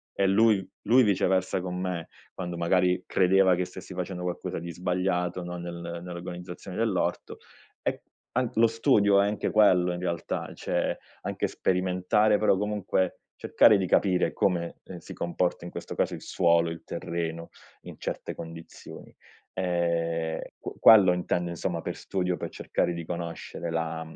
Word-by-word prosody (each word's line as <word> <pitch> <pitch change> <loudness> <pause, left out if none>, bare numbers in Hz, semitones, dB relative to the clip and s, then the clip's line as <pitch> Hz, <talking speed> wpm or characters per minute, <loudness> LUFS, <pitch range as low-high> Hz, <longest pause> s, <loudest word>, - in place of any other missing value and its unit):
e 100 - +2
lui 100 -1 +4 0.2
lui 125 +3 +6
viceversa 95 -3 +1
con 90 -1 -4
me, 90 -3 -3 0.2
quando 90 -2 -5
magari 90 +1 +2
credeva 95 0 +4
che 90 +1 0
stessi 95 +1 -10
facendo 90 0 -4
qualcosa 90 -1 -3
di 85 +1 -5
sbagliato, 90 0 -1
no, 90 0 -5
nel 85 0 -6
nell'organizzazione 90 +1 -7
dell'orto, 110 -5 -1 0.5
e - - -2 0.3
an 125 -2 +1
lo 115 - +5
studio 110 -4 +4
è 100 - +2
anche 105 0 -2
quello, 90 -4 +4
in 90 - -4
realtà, 85 -2 -3
cioè - - -1 0.2
anche - - -2
sperimentare, 95 +4 +2
però 105 -3 +3
comunque, 100 -3 -1 0.2
cercare 110 - +5
di 95 - 0
capire 90 0 +2
come, 85 -3 0
ehm, - - -8
si - - -10
comporta 85 0 -2
in 85 - -7
questo - - -7
caso - - 0
il - - -10
suolo, 85 -2 +2
il 85 - -8
terreno 85 -1 -4 0.3
in - - -10
certe - - -4
condizioni, 80 0 -10 0.4
ehm, 85 -3 -1 0.2
qu - - -7
quello 100 -5 +8
intendo, 90 -1 -1
insomma, 85 - -3
per - - -4
studio, 90 -2 -1
per - - -5
cercare 85 - -1
di 85 -1 -6
conoscere 85 0 -5
la 80 0 -2
mhmm, 80 0 -12
90 Hz, 155 wpm, -27 LUFS, 85-95 Hz, 0.5 s, quello